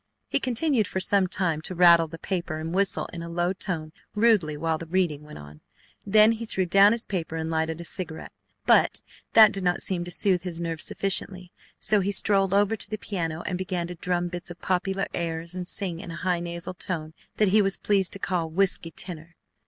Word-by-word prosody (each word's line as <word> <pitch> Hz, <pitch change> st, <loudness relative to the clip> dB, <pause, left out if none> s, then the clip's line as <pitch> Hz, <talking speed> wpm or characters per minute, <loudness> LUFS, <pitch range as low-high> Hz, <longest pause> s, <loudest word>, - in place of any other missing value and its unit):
He -, -, 0 dB
continued 255 Hz, -, +1 dB
for 190 Hz, -, -3 dB
sometime 185 Hz, -4 st, +1 dB
to 185 Hz, -, -5 dB
rattle 170 Hz, -2 st, +6 dB
the 165 Hz, -, -9 dB
paper 175 Hz, -2 st, -3 dB
and 160 Hz, +2 st, -5 dB
whistle 195 Hz, 0 st, +1 dB
in 170 Hz, -, -6 dB
a 170 Hz, -, -7 dB
low 175 Hz, +2 st, 0 dB
tone 165 Hz, -5 st, -3 dB, 0.2 s
rudely 210 Hz, -9 st, +3 dB
while 160 Hz, +1 st, -1 dB
the 165 Hz, -, -8 dB
reading 170 Hz, -4 st, 0 dB
went 150 Hz, 0 st, -11 dB
on, 75 Hz, +1 st, -13 dB, 0.5 s
then 215 Hz, +2 st, +6 dB
he 230 Hz, 0 st, -4 dB
threw 190 Hz, -4 st, +1 dB
down 195 Hz, +3 st, +6 dB
his 230 Hz, +1 st, -1 dB
paper 165 Hz, -5 st, -4 dB
and 160 Hz, 0 st, -3 dB
lighted 160 Hz, 0 st, -1 dB
a -, -, -5 dB
cigarette. 170 Hz, -1 st, -4 dB, 0.3 s
But -, -, +3 dB, 0.3 s
that 220 Hz, -2 st, +8 dB
did 195 Hz, -, -4 dB
not 180 Hz, -1 st, +1 dB
seem 180 Hz, -2 st, -2 dB
to -, -, -7 dB
soothe 180 Hz, 0 st, +1 dB
his 175 Hz, -2 st, -6 dB
nerves 165 Hz, -2 st, -2 dB
sufficiently, 185 Hz, -2 st, -1 dB, 0.3 s
so 215 Hz, -, +3 dB
he 200 Hz, +1 st, 0 dB
strolled 195 Hz, -1 st, +2 dB
over 205 Hz, +2 st, +3 dB
to -, -, -5 dB
the 215 Hz, -, -3 dB
piano 170 Hz, -6 st, -4 dB
and 180 Hz, -, -2 dB
began 180 Hz, -2 st, -2 dB
to -, -, -5 dB
drum 175 Hz, 0 st, -2 dB
bits 175 Hz, 0 st, -7 dB
of 175 Hz, 0 st, -10 dB
popular 190 Hz, +1 st, -1 dB
airs 165 Hz, 0 st, -3 dB
and 180 Hz, -1 st, -5 dB
sing 185 Hz, -4 st, -2 dB
in 170 Hz, -, -8 dB
a 165 Hz, -, -6 dB
high 180 Hz, 0 st, -1 dB
nasal 170 Hz, +1 st, -4 dB
tone 160 Hz, -4 st, -4 dB, 0.2 s
that 210 Hz, -2 st, +3 dB
he 210 Hz, +3 st, +5 dB
was 195 Hz, -1 st, +2 dB
pleased 195 Hz, -3 st, +1 dB
to -, -, -1 dB
call 180 Hz, -4 st, -2 dB
"whiskey 175 Hz, 0 st, 0 dB
tenor." 165 Hz, 0 st, -8 dB
180 Hz, 215 wpm, -26 LUFS, 165-195 Hz, 0.5 s, that